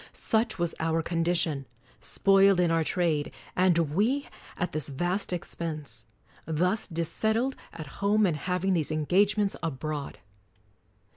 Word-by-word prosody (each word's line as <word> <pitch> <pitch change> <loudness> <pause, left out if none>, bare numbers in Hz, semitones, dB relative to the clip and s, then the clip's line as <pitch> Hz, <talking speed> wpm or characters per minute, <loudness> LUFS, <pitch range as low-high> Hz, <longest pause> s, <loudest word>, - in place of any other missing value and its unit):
Such 220 -1 0
was 170 -2 -1
our 165 0 0
condition: 165 -5 0 0.3
spoiled 195 -1 +4
in 175 -2 +3
our 165 -1 +2
trade, 160 -3 0 0.2
and 180 -2 +4 0.2
we 245 - +1 0.3
at 180 - -1
this 155 -2 -2
vast 175 +9 -1
expense; 155 -9 -5 0.4
thus 180 +7 0
dissettled 220 +10 0 0.2
at 155 - -8 0.2
home, 210 +1 +4
and 175 -5 +1
having 180 +4 0
these 160 -5 +1
engagements 195 +7 +2
abroad. 150 -5 -4
175 Hz, 125 wpm, -28 LUFS, 155-195 Hz, 0.4 s, spoiled